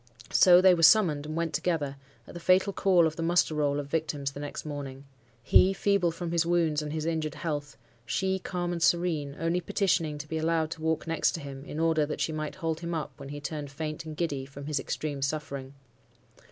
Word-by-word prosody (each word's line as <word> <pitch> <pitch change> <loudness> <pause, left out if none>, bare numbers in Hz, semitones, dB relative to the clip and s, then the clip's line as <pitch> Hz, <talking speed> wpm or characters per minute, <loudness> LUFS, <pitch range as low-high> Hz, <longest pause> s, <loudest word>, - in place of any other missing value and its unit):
So, 180 -1 +7
they 185 -1 +7
were 170 - 0
summoned 160 -4 +5
and 155 - -5
went 165 -1 -1
together, 145 -4 -1 0.3
at - - -12
the 175 - -7
fatal 185 +3 +3
call 185 -4 +4
of 160 +1 -2
the - - -3
muster 170 -1 +2
roll 145 -1 0
of 145 - -4
victims 145 -2 -2
the 140 - -9
next 145 +1 -6
morning. 140 -2 -6 0.4
He, 190 +10 +5
feeble 200 -3 +2
from 165 0 -5
his 170 -1 +2
wounds 165 -3 +1
and 150 -1 -5
his 155 0 -3
injured 160 -2 -2
health; 145 -3 -4 0.3
she, 190 - -1
calm 175 -1 -3
and 170 -1 -3
serene, 160 -5 +1
only 165 +2 0
petitioning 170 -5 0
to 150 +1 -7
be 160 +1 -3
allowed 160 0 0
to 160 - -6
walk 160 0 0
next 165 0 +1
to - - -4
him, 135 -2 -8
in 155 - -6
order 160 -1 +2
that 150 - -4
she - - 0
might 155 -1 -4
hold 165 -3 -2
him 170 0 -4
up 155 - -3
when 140 0 -8
he 145 0 -6
turned 145 0 -5
faint 155 +2 -5
and 155 -1 -8
giddy 145 -6 -1
from 140 +1 -10
his 150 -1 -1
extreme 145 -3 -4
suffering. 140 -1 -4
160 Hz, 220 wpm, -28 LUFS, 145-170 Hz, 0.4 s, So